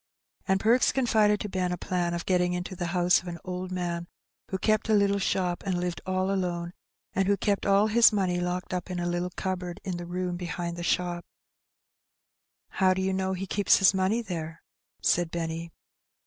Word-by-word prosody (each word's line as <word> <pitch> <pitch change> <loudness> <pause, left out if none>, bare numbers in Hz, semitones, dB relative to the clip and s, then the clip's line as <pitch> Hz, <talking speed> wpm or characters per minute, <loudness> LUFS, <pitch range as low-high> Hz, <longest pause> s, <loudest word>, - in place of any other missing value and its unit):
And 190 0 +3
Perks 235 +5 +4
confided 215 -5 +3
to - - -3
Ben 185 -1 -1
a 180 - -2
plan 175 -1 -1
of 170 - -4
getting 180 -1 +2
into 180 +1 -4
the 175 -1 -3
house 175 0 +3
of 180 - -13
an 170 -1 -5
old 185 0 -5
man 175 -1 -3 0.4
who 190 - -1
kept 215 +3 +1
a 215 - +5
little 200 -1 +3
shop, 180 -2 0
and 185 -3 -1
lived 175 -1 -3
all 185 +1 0
alone, 175 -2 -2 0.4
and 195 0 +1
who 200 0 +3
kept 200 0 0
all 200 +1 +5
his 230 +2 +6
money 185 -4 0
locked 180 +1 -3
up 180 0 -3
in 180 -1 -3
a 175 - -2
little 175 +1 -1
cupboard 185 -1 -3
in 185 -3 -3
the 175 0 -7
room 180 0 -2
behind 175 -1 -4
the 175 - -6
shop. 175 0 0 1.5
"How 185 -1 +2
do 190 - -1
you 190 0 0
know 190 0 -1
he 190 +1 -4
keeps 200 +1 +3
his 195 -1 +5
money 195 +5 +1
there?" 165 -4 -6 0.4
said 175 -1 +2
Benny. 165 0 -4
180 Hz, 200 wpm, -27 LUFS, 175-195 Hz, 1.5 s, his